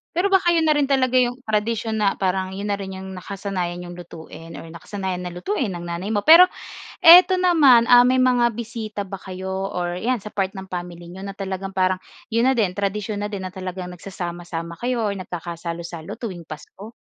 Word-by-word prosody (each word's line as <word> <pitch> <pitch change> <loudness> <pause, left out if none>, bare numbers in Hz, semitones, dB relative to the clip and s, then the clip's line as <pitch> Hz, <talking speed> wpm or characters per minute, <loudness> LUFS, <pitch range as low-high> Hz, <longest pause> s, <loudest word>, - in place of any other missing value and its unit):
Pero 390 +3 +1
baka 365 -2 +4
'yon 325 -1 +2
na 305 - +4
rin 290 -2 +2
talaga 260 -2 +1
'yong 250 +1 -1
tradisyon 220 +1 -1
na 200 -2 +2
parang 190 0 -1
'yon 200 +2 -4
na 200 - 0
rin 190 -1 -6
'yong 190 0 -8
nakasanayan 185 -2 -4
n'yong 175 0 -9
lutuin 165 -1 -11
or - - -9
nakasanayan 190 +2 -5
na 180 -1 -6
lutuin 245 - -2
ng 175 - -7
nanay 175 +3 -4
mo. 205 - +1
Pero 335 +4 +9 0.5
ito 360 +3 +9
naman, 285 -10 +5
ah, 245 0 +8
may 255 +1 +3
mga 245 -2 +3
bisita 220 -2 -6
ba 195 - -6
kayo 190 0 -7 0.2
or 175 -2 -3
'yan, 250 +3 0
sa 210 +1 -9
part 195 -1 -1
ng 190 0 -8
family 175 -1 -7
niyo 190 +2 -9
na 195 0 -6
talagang 195 0 -4
parang 185 -1 +1 0.3
'yon 230 +1 +2
na 265 - +4
din, 205 -5 +2
tradisyon 205 +1 -2
na - - -4
din 195 -2 -5
na 185 - -11
talagang 185 -1 -6
nagsasama-sama 175 -2 -6
kayo 240 -3 -1
or 200 - -1
nagkakasalo-salo 170 0 -6
tuwing 185 -8 -6
Pasko? 195 +8 -10
195 Hz, 200 wpm, -22 LUFS, 180-235 Hz, 0.5 s, Pero